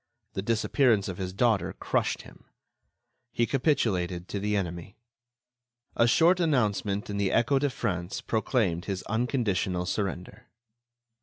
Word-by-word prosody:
The 95 Hz, -, -2 dB
disappearance 115 Hz, 0 st, +2 dB
of 95 Hz, -1 st, -5 dB
his 95 Hz, -1 st, -3 dB
daughter 110 Hz, +1 st, +1 dB
crushed -, -, -1 dB
him; -, -, -16 dB, 0.9 s
he 120 Hz, -, +1 dB
capitulated 95 Hz, -, 0 dB
to 100 Hz, -, -3 dB
the 105 Hz, +1 st, 0 dB
enemy. 85 Hz, 0 st, -5 dB, 1.0 s
A 115 Hz, -, +4 dB
short 170 Hz, +8 st, +4 dB
announcement 105 Hz, -, +1 dB
in 100 Hz, -, -4 dB
the 100 Hz, -2 st, +1 dB
Echo 120 Hz, +4 st, +3 dB
de 145 Hz, +1 st, +1 dB
France 90 Hz, -8 st, -3 dB
proclaimed 110 Hz, -6 st, 0 dB
his 95 Hz, -2 st, -3 dB
unconditional 110 Hz, -6 st, -1 dB
surrender. 95 Hz, -1 st, -4 dB
105 Hz, 130 wpm, -28 LUFS, 95-120 Hz, 1.0 s, A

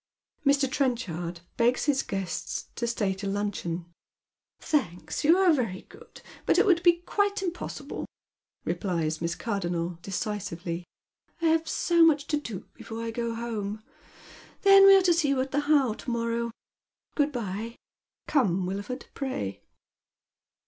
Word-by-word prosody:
Mr. 280 Hz, -1 st, +4 dB
Trenchard 180 Hz, -, -2 dB, 0.2 s
begs 240 Hz, +2 st, +2 dB
his 285 Hz, -3 st, +2 dB
guests 195 Hz, -3 st, -4 dB
to 235 Hz, -, -2 dB
stay 210 Hz, -4 st, 0 dB
to 195 Hz, +1 st, -5 dB
luncheon. 195 Hz, -4 st, -2 dB, 0.4 s
" -, -, -66 dB
Thanks; 180 Hz, -, 0 dB
you 325 Hz, +4 st, +6 dB
are 375 Hz, -3 st, +5 dB
very 225 Hz, -10 st, -1 dB
good, 455 Hz, +3 st, -16 dB, 0.2 s
but -, -, +4 dB
it -, -, +5 dB
would 355 Hz, -4 st, +4 dB
be 345 Hz, -1 st, +4 dB
quite 405 Hz, 0 st, 0 dB
impossible," 355 Hz, -2 st, -5 dB, 0.6 s
replies 165 Hz, -5 st, -1 dB
Miss 170 Hz, 0 st, -1 dB
Cardonnel, 175 Hz, -4 st, -2 dB
decisively. 180 Hz, -3 st, -4 dB, 0.3 s
" -, -, -42 dB
I 330 Hz, -, +5 dB
have 325 Hz, 0 st, +2 dB
so 340 Hz, -1 st, +3 dB
much 300 Hz, -3 st, +4 dB
to 300 Hz, -, +2 dB
do 230 Hz, -10 st, -5 dB
before 225 Hz, 0 st, -7 dB
I 230 Hz, -, -3 dB
go 235 Hz, 0 st, -2 dB
home. 215 Hz, -2 st, -4 dB, 0.8 s
Then 390 Hz, 0 st, +9 dB
we 390 Hz, -, +10 dB
are 380 Hz, -, +3 dB
to 355 Hz, -1 st, +5 dB
see 330 Hz, -3 st, +2 dB
you 275 Hz, -1 st, +2 dB
at 265 Hz, 0 st, -3 dB
the 290 Hz, -, +1 dB
How 275 Hz, -7 st, +4 dB
to 235 Hz, -, -8 dB
mon 230 Hz, -1 st, -1 dB
ow. -, -, -8 dB, 0.6 s
Good 295 Hz, -1 st, +1 dB
bye 225 Hz, -1 st, -4 dB, 0.3 s
— -, -, -53 dB
Come, 195 Hz, -, +2 dB
Wilford, 200 Hz, +8 st, -4 dB
pray." 180 Hz, -, -4 dB
235 Hz, 155 wpm, -27 LUFS, 190-295 Hz, 0.8 s, we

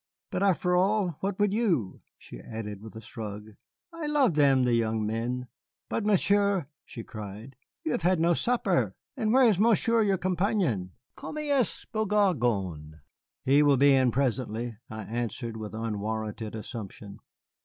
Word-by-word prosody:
But, 180 Hz, -, -2 dB
after 180 Hz, -2 st, +2 dB
all, 185 Hz, -3 st, +2 dB
what 195 Hz, 0 st, -2 dB
would 205 Hz, -1 st, +2 dB
you?" 175 Hz, -, 0 dB, 0.2 s
she -, -, -11 dB
added 105 Hz, -, -7 dB
with 110 Hz, +1 st, -11 dB
a 110 Hz, -, -7 dB
shrug; 110 Hz, -2 st, -7 dB, 0.4 s
"I 330 Hz, -2 st, -4 dB
love 285 Hz, -, +3 dB
them, 140 Hz, -3 st, +4 dB
the 125 Hz, -1 st, +2 dB
young 110 Hz, -2 st, +1 dB
men. 120 Hz, +3 st, -2 dB, 0.4 s
But, 225 Hz, -, -1 dB
Monsieur," 200 Hz, -3 st, +3 dB, 0.2 s
she 115 Hz, -, -9 dB
cried, 110 Hz, +5 st, -9 dB, 0.3 s
"you 155 Hz, -, -1 dB
have -, -, -1 dB
had 180 Hz, +1 st, +2 dB
no 170 Hz, +1 st, +4 dB
supper! 245 Hz, +8 st, +1 dB, 0.2 s
And 220 Hz, -5 st, 0 dB
where 260 Hz, 0 st, +6 dB
is 205 Hz, -5 st, +3 dB
Monsieur 230 Hz, +1 st, +3 dB
your 200 Hz, -3 st, +2 dB
companion? 180 Hz, -, 0 dB, 0.2 s
Comme 305 Hz, -, -7 dB
il 295 Hz, -2 st, 0 dB
est 240 Hz, -, -1 dB
beau 220 Hz, -1 st, -1 dB
garçon!" 120 Hz, -, +1 dB, 0.5 s
"He 140 Hz, +3 st, +5 dB
will 145 Hz, -2 st, +5 dB
be 140 Hz, +1 st, +6 dB
in 130 Hz, -2 st, +4 dB
presently," 120 Hz, -2 st, -1 dB
I 110 Hz, 0 st, -6 dB
answered 115 Hz, +1 st, -4 dB
with 110 Hz, -1 st, -6 dB
unwarranted 110 Hz, 0 st, -3 dB
assumption. 105 Hz, -2 st, -8 dB
135 Hz, 160 wpm, -28 LUFS, -, 0.5 s, where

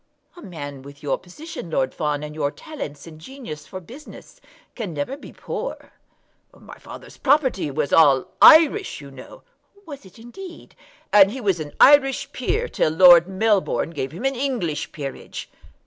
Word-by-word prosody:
"A 350 Hz, -, -13 dB
man 145 Hz, -, -8 dB
with 140 Hz, +2 st, -14 dB
your 140 Hz, -, -1 dB
position, 185 Hz, -, -10 dB
Lord 130 Hz, -4 st, -1 dB
Fawn, 150 Hz, -1 st, -2 dB
and 150 Hz, 0 st, -7 dB
your 150 Hz, -2 st, -1 dB
talents 150 Hz, -, -9 dB
and 155 Hz, -2 st, -13 dB
genius 240 Hz, -, -10 dB
for 185 Hz, -, -8 dB
business, 275 Hz, -, -14 dB, 0.3 s
can 205 Hz, -9 st, -6 dB
never 145 Hz, -, -3 dB
be 285 Hz, -, -13 dB
poor." -, -, -7 dB, 0.7 s
"My -, -, -14 dB
father's -, -, -12 dB
property 265 Hz, -, +1 dB
was 145 Hz, +1 st, -3 dB
all 140 Hz, -5 st, +5 dB, 0.2 s
Irish, 330 Hz, +5 st, +6 dB
you 140 Hz, -1 st, -12 dB
know." 130 Hz, -1 st, -13 dB, 0.4 s
"Was 285 Hz, -4 st, -10 dB
it 190 Hz, +1 st, -17 dB
indeed?" 335 Hz, +11 st, -12 dB, 0.4 s
"And 200 Hz, -2 st, +7 dB
he 255 Hz, +6 st, -6 dB
was 195 Hz, -7 st, 0 dB
an 150 Hz, -2 st, -7 dB
Irish 275 Hz, -1 st, +5 dB
peer, 475 Hz, +2 st, -2 dB
till -, -, 0 dB
Lord 175 Hz, +1 st, +7 dB
Melbourne 195 Hz, -3 st, 0 dB
gave 135 Hz, -5 st, -5 dB
him 185 Hz, -, -7 dB
an 270 Hz, -, +1 dB
English 240 Hz, -, -3 dB
peerage." 140 Hz, -3 st, -8 dB
180 Hz, 165 wpm, -22 LUFS, -, 0.7 s, And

